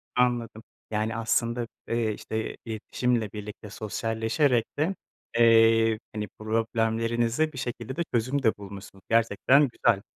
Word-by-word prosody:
Anladım. 120 -3 +1 0.3
Yani 110 +1 -1
aslında, 115 +1 0 0.2
eee, 115 -2 0
işte 110 +1 -4
iletişimle 115 0 -1
birlikte 105 0 -8
sosyalleşerek 115 +4 0
de, 170 +6 +1 0.4
eee, 115 -1 +5
hani 105 0 -3
problemlerinize 115 +5 0
bir - - -9
şekilde 120 0 -4
de 170 - 0
çözüm 130 +4 0
de 110 - +3
bulmuşsunuz, 100 -1 -10
gerçekten 115 +5 +4
güzel. 115 -3 +2
115 Hz, 120 wpm, -27 LUFS, 110-120 Hz, 0.4 s, eee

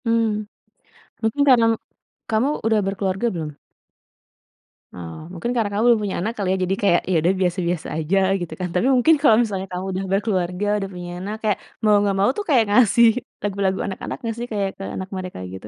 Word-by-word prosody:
Mmm, 225 -2 +1 0.8
mungkin 225 +5 0
karena 240 -3 +6 0.7
kamu 225 +6 +2 0.2
udah 220 -1 +3
berkeluarga 195 +3 -1
belum? 155 -4 -5 1.4
Oh, 85 -2 -8
mungkin 185 +7 -3
karena 225 -4 +1
kamu 205 +2 0
belum 235 -3 +5
punya 200 - -2
anak 215 +6 -2
kali 200 -4 -2
ya, 190 - +1
jadi 190 - +1
kayak, 175 -4 +4
ya - - +2
udah 180 +3 +3
biasa-biasa 175 -2 -1
aja 160 +5 0 0.2
gitu 175 -3 -5
kan. 180 - -2
Tapi 205 +8 +2
mungkin 285 +6 +5
kalau 225 -7 +7
misalnya 195 -5 -1
kamu 180 +1 -4
udah 190 - -2
berkeluarga, 195 -2 0
udah 195 -1 -4
punya 175 -1 -7
anak 200 +4 -4
kayak, 210 -2 +1 0.3
mau 210 -1 +5
nggak 200 -1 0
mau 200 - +4
tuh 415 - -1
kayak 255 -6 +5
ngasih 235 +1 +5 0.4
lagu-lagu 195 -2 0
anak-anak 190 - -5
nggak 230 -2 -4
sih, 240 - -4
kayak 200 -2 0
ke 195 - -7
anak 190 0 -5
mereka 185 - -6
gitu? 95 +2 -9
195 Hz, 190 wpm, -22 LUFS, 185-225 Hz, 1.4 s, kalau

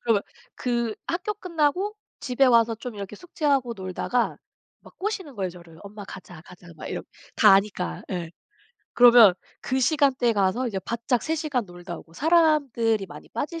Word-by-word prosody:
그러면 225 -4 +1 0.3
그 235 -3 -1
학교 370 +5 -2
끝나고 365 +2 -1 0.2
집에 255 +1 +1
와서 230 -2 +4
좀 240 +1 -7
이렇게 200 0 -7
숙제하고 280 -7 -1
놀다가 190 +5 -2 0.4
막 - - -18
꼬시는 380 -8 -4
거예요 190 -4 -3
저를. 170 -2 -15
"엄마 205 0 -9
가자. 180 -4 -11
가자." 175 0 -15
막 - - -9
이렇 - - -4 0.3
다 - - +6
아니까. 195 -2 -1
예. 175 -3 -4 0.6
그러면 240 -5 +8 0.3
그 260 - -1
시간대에 270 -4 +2
가서 205 +5 +1
이제 195 - -3
바짝 235 +2 -1
3 320 - -1
시간 295 -7 -2
놀다 175 -1 -9
오고 165 - -16
사람들이 280 - +2
많이 - - -12
빠질 330 +3 -4
235 Hz, 330 characters per minute, -25 LUFS, 195-290 Hz, 0.6 s, 그러면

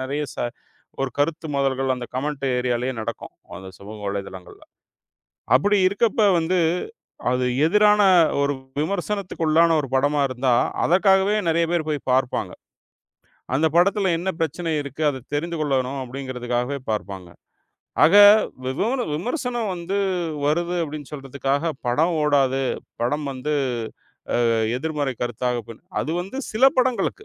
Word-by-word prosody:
நெறைய 140 +3 -2
ச - - -25 0.7
ஒரு 135 - -1
கருத்து 160 +2 0
மோதல்கள் 135 -1 +1
அந்தக் 125 -1 -8
கமெண்ட் 140 +1 -3
ஏரியாலயே 125 +1 -1
நடக்கும். - - -6 0.3
அந்தச் 95 -1 -11
சமூக 105 +2 -10
வலைத்தளங்கள்ல. 95 -2 -7 0.9
அப்படி 205 +11 +4
இருக்கப்ப 215 +3 0 0.2
வந்து, 175 +3 0 0.7
அது 125 0 0 0.2
எதிரான 210 +3 +4 0.4
ஒரு 140 0 +1 0.3
விமர்சனத்துக்குள்ளான 170 -3 +1
ஒரு 135 - -7
படமா 145 +2 +2
இருந்தா 130 0 +1 0.3
அதற்காகவே 190 +3 +3
நிறைய 165 +1 +2
பேர் 165 -3 0
போய்ப் 145 -3 -3
பார்ப்பாங்க. 130 -1 0 1.0
அந்தப் 160 +3 +1
படத்துல 190 0 +3
என்ன 190 +2 -1
பிரச்சனை 165 +1 -2
இருக்கு, 140 +2 -7
அதைத் 130 -1 -9
தெரிந்து 165 +2 -2
கொள்ளணும் 135 -2 -1
அப்படிங்கறதுக்காகவே 125 0 -3
பார்ப்பாங்க. 95 -4 -4 0.8
ஆக, 175 +6 +4 0.5
விமோர 210 - -1
விமர்சனம் 240 - -2
வந்து 180 +2 -4 0.5
வருது 170 +4 0
அப்டின்னு 150 -2 -7
சொல்றதுக்காகப், 140 +2 -2
படம் 160 +8 +2
ஓடாது. 135 -2 +2 0.4
படம் 145 +5 -1
வந்து 135 +3 -3 0.9
ஆ - - +3 0.3
எதிர்மறை 145 -2 -2
கருத்தாக 120 +1 -2
போ - - -6 0.3
அது 155 - -3
வந்து 195 +8 -7 0.2
சில 230 +5 +3
படங்களுக்கு. 255 - 0
145 Hz, 125 wpm, -23 LUFS, 130-175 Hz, 1.0 s, அப்படி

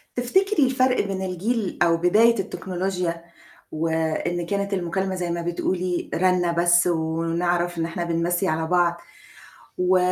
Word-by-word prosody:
تفتكري 310 - +2
الفَرق 255 0 +2
بين 195 -1 -3
الجيل 190 +3 -2
أو 165 -1 +3
بداية 215 +6 +4
التكنولوجيا، 180 -2 -3 0.5
وإن 160 +2 -1
كانت 200 +2 -2
المكالمة 190 +1 -2
زي 180 -1 -3
ما 170 0 -2
بتقولي 175 +1 -2
رنة 180 -1 +2
بس 175 +1 +3
ونعرف 170 +1 -1
إن 165 - 0
إحنا 170 +1 -4
بنمَّسي 170 +2 0
على 160 -1 -1
بعض، 175 0 +2 0.8
و 180 +1 +3
175 Hz, 130 wpm, -23 LUFS, 170-190 Hz, 0.8 s, بداية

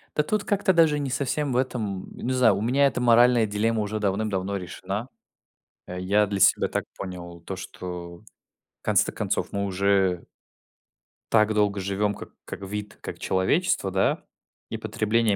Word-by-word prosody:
Да 150 - +3
тут 210 +5 -1
как-то 200 -2 +2
даже 160 -3 +4
не 140 - -2
совсем 140 +2 -1
в 125 - +1
этом, 110 -7 -2
м, - - -8
не 130 - +1
знаю, 125 -6 +4
у 100 - -3
меня 135 +5 +3
эта 125 - -2
моральная 120 -1 +5
дилемма 110 +2 0
уже 105 +1 -2
давным-давно 100 -1 -1
решена. 100 +5 -5 0.8
Э, 90 0 -6
я 100 +3 +2
для 100 -1 -3
себя - - +5
так - - -2
понял 85 -2 -7
то, 95 +3 -6
что 90 -2 -7
в - - -22 0.6
конце-то - - +2
концов - - -2
мы 100 0 -1
уже 95 -2 +1 1.1
так 110 -1 +4
долго 105 -1 +2
живем 100 +2 0
как - - -9 0.2
как - - -7
вид, 105 +2 -6
как - - -7
человечество, 100 - +1
да, 95 +1 +1 0.5
и - - -3
потребление 110 -1 +1
105 Hz, 170 wpm, -25 LUFS, 95-120 Hz, 1.1 s, моральная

